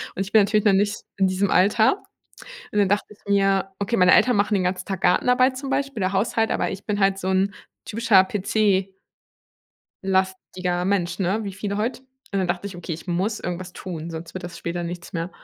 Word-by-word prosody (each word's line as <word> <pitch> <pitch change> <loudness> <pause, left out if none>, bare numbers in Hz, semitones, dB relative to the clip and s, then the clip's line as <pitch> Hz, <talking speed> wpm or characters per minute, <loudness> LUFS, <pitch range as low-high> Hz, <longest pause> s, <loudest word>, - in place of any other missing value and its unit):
Und - - -2
ich 195 +1 -4
bin 220 - +6
natürlich 210 +1 +1
noch 205 - +5
nicht 205 +2 +2 0.2
in 195 - +3
diesem 190 +1 0
Alter. 215 - +3 0.7
Und 210 - +2
dann 200 -2 +3
dachte 205 +1 +1
ich 205 - -24
mir: 195 -1 +2
„Okay“ 200 +3 0
meine 180 0 +6
Eltern 245 +2 +5
machen 205 +1 +1
den 195 -2 +2
ganzen 185 0 -2
Tag 190 -2 -4
Gartenarbeit 250 +8 +3
zum 275 +1 -5
Beispiel 275 -5 -1
oder 185 - +1
Haushalt, 225 +3 +1
aber - - 0
ich 195 +1 -8
bin 205 -1 -1
halt 195 -1 +3
so 190 - -4
'n 190 +1 +1 0.3
typischer 220 -3 +4
PC 195 -1 0 1.1
lastiger 185 -2 -1
Mensch, 185 -2 0
ne, 190 +3 +1
wie 200 -2 -5
viele 200 +1 -4
heute. 235 +4 -2 0.3
Und 200 - 0
dann 185 - 0
dachte 175 +3 -2
ich: 195 - -9
„Okay, 175 -1 -5
ich 165 +4 -10
muss 190 +5 -1
irgendwas 180 +1 -5
tun, 170 -4 -6
sonst 165 +1 -8
wird 185 - -6
das 175 - -7
später 175 +1 -4
nichts 170 0 -7
mehr.“ 170 +1 -3
195 Hz, 215 wpm, -23 LUFS, 180-210 Hz, 1.1 s, bin